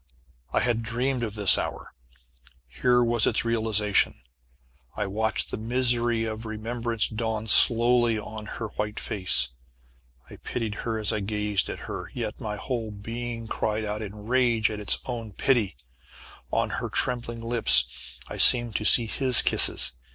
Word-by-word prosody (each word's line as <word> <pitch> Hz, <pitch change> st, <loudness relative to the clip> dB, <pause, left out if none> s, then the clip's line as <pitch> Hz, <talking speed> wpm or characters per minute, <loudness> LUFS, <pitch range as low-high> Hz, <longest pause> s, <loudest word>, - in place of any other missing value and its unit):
I -, -, 0 dB
had 120 Hz, -2 st, -1 dB
dreamed 125 Hz, +3 st, -2 dB
of 110 Hz, -3 st, -4 dB
this 105 Hz, -3 st, +4 dB
hour. -, -, -6 dB, 0.7 s
Here 125 Hz, -, +1 dB
was 120 Hz, -2 st, +1 dB
its -, -, +1 dB
realization. 110 Hz, -3 st, 0 dB, 0.8 s
I -, -, -2 dB
watched 110 Hz, +3 st, -2 dB
the -, -, -4 dB
misery 120 Hz, 0 st, 0 dB
of 110 Hz, 0 st, -6 dB
remembrance 115 Hz, +1 st, -3 dB
dawn 110 Hz, -1 st, -4 dB
slowly 120 Hz, +1 st, +5 dB
on 105 Hz, 0 st, -8 dB
her 110 Hz, 0 st, -6 dB
white 105 Hz, +1 st, -5 dB
face. 90 Hz, -10 st, 0 dB, 0.8 s
I -, -, -13 dB
pitied 115 Hz, -3 st, -5 dB, 0.2 s
her 110 Hz, -, -2 dB
as 105 Hz, -2 st, -1 dB
I 110 Hz, -, -2 dB
gazed 105 Hz, 0 st, -2 dB
at -, -, -7 dB
her, -, -, -7 dB
yet -, -, -5 dB
my 105 Hz, -1 st, -4 dB
whole 115 Hz, 0 st, -5 dB
being 115 Hz, +3 st, -7 dB
cried 110 Hz, 0 st, -3 dB
out 105 Hz, +1 st, -4 dB
in 105 Hz, 0 st, -9 dB
rage 120 Hz, -3 st, +1 dB
at 105 Hz, -, -6 dB
its 105 Hz, -, +3 dB
own 115 Hz, -4 st, -6 dB
pity. 115 Hz, -, 0 dB, 0.7 s
On -, -, -1 dB
her -, -, -4 dB
trembling 120 Hz, -2 st, -2 dB
lips 115 Hz, 0 st, +1 dB
I -, -, -8 dB
seemed 120 Hz, -3 st, +7 dB
to 110 Hz, -, -5 dB
see 115 Hz, +1 st, +6 dB
his 125 Hz, +2 st, +5 dB
kisses. -, -, +3 dB
110 Hz, 155 wpm, -25 LUFS, 105-120 Hz, 0.8 s, seemed